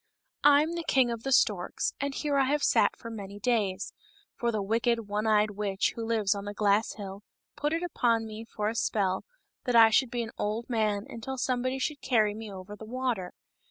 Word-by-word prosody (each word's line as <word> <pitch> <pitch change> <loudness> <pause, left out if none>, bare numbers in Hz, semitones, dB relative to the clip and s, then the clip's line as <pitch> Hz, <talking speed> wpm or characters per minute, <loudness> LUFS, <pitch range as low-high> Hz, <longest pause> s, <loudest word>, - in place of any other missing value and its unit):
" - - -53
I 290 0 +7
am 320 - -3 0.2
king 255 -3 +3
of 230 -1 -4
the 270 - -3
storks, 205 -8 +2
and 280 -1 -2
here 295 -2 -1
I 275 -1 +4
have 290 +2 0
sat - - +3
for 230 - -8
many 200 -2 -7
days; 205 -4 0 0.4
for 235 -1 0
the 215 - -1
wicked 230 +2 0
one 210 +2 -1
eyed 215 -1 +3
witch 200 -1 -1
who 230 - -4
lives 220 -3 +1
on 200 0 -6
the 205 0 -6
glass 210 +1 +2
hill 200 -1 -8 0.3
put 295 +1 -1
it 330 +2 -1
upon 235 -9 +1
me 220 0 -7
for 210 -2 -3
a 220 - 0
spell 200 -5 0 0.4
that 245 -2 0
I 225 -1 +8
should 255 +2 +3
be 240 0 -2
an 225 - -7
old 215 +3 -2
man 215 -3 0
until 265 +4 -6
somebody 255 0 0
should 285 +2 -3
carry 220 -5 +2
me 215 0 -7
over 190 +2 -8
the 210 - -11
water. 235 -5 -2
225 Hz, 215 wpm, -29 LUFS, 205-250 Hz, 0.4 s, I